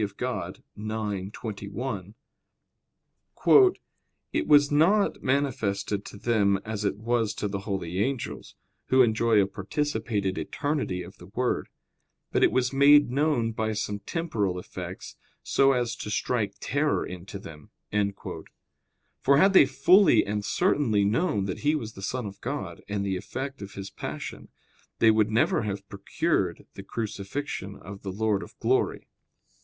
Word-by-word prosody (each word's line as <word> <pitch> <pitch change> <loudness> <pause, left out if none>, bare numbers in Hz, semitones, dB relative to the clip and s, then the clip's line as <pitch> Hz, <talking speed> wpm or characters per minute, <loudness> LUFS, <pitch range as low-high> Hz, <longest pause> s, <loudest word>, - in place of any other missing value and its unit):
Dei - - +2
ix, 115 +5 -4 0.7
21), 105 -1 -5 2.2
"It - - 0
was 145 -1 +6
not 180 +8 +3
manifested 110 -7 -1
to - - -9
them 100 -3 +2
as 110 -1 -3
it 100 -1 0
was 115 0 0
to 105 - -2
the 100 0 -3
holy 95 -3 -3
angels, 130 +3 -3 0.3
who 130 0 +6
enjoy 110 -1 +3
a 100 - +4
participated 100 -1 -2
eternity 145 - -2
of 85 - -13
the 90 - -12
Word; 125 +5 -1 0.6
but - - +2
it - - +5
was 130 +1 +1
made 145 -1 +6
known 140 -4 +1
by 110 0 -1
some 105 -1 -3
temporal 105 - -2
effects, 90 - -8 0.3
so 135 0 +4
as 120 -2 -1
to - - -6
strike 105 -1 -1
terror 145 +1 0
into 90 +2 -8
them." 75 -6 -12 1.5
For 140 - +4
had 195 +6 +5
they 145 - +8
fully 160 +8 +5
and 105 0 -2
certainly 115 - +2
known 105 - +1
that 95 - -4
He 150 +2 +2
was 115 -7 -4
the 95 - -10
Son 125 +4 -3
of 100 -1 -8
God - - -4
and 100 -1 -1
the 95 -1 -1
effect 135 +7 -6
of 100 0 -8
His 95 0 -7
passion, - - -7 0.5
they 115 - +6
would 110 -1 +3
never 110 +2 +2
have 100 -2 -4
procured 100 -1 -1
the - - -8
crucifixion 100 -1 -4
of 95 +2 -10
the 95 - -5
Lord 105 0 0
of - - -11
glory. - - 0
110 Hz, 145 wpm, -27 LUFS, 100-135 Hz, 2.2 s, they